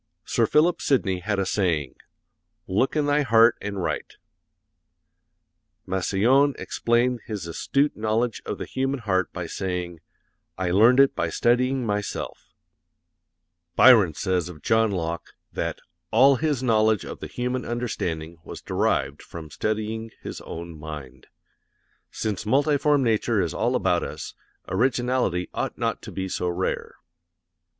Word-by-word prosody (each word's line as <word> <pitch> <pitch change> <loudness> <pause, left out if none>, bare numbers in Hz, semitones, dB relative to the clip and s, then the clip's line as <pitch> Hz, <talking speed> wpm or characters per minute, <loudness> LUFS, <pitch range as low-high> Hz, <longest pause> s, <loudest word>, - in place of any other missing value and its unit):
Sir 115 - +1
Philip 165 +7 +3
Sidney 95 -10 +1
had 100 +3 -2
a 95 - 0
saying, 85 -9 0 0.7
'Look 105 +11 +1
in 150 -1 +2
thy 145 +1 +2
heart 115 -2 +5
and 100 -2 -4
write;' - - -3 1.7
Massillon 110 +9 +2
explained 120 +1 0
his 105 -6 -4
astute 140 - 0
knowledge 110 +2 -1
of - - -4
the - - -5
human 135 0 -2
heart 95 -4 0
by 90 -2 -5
saying, 90 -1 -4 0.6
'I 90 -1 -1
learned 115 +7 +5
it 140 0 +5
by 85 - -1
studying 125 +7 +1
myself;' 105 -1 -4 1.2
Byron 105 - +7
says 90 +4 -1
of 75 -4 -12
John 110 0 +3
Locke 85 -3 -4 0.2
that - - -2 0.3
'all 130 +4 +5
his 150 -4 -1
knowledge 110 -3 +3
of - - -7
the - - -6
human 125 +1 -3
understanding 85 -9 -3
was - - -9
derived - - 0
from 80 -3 -10
studying 110 +3 -2
his - - -6
own 85 -1 -8
mind.' 70 -4 -9 0.8
Since 105 -2 -3
multiform 145 +4 +2
nature 115 -1 +1
is 85 -4 0
all - - 0
about - - +2
us, - - -6 0.3
originality 120 -3 0
ought - - -3
not - - -1
to - - -9
be 95 -1 -3
so 90 -1 -2
rare." 90 +2 -3
110 Hz, 135 wpm, -25 LUFS, 90-125 Hz, 1.7 s, Byron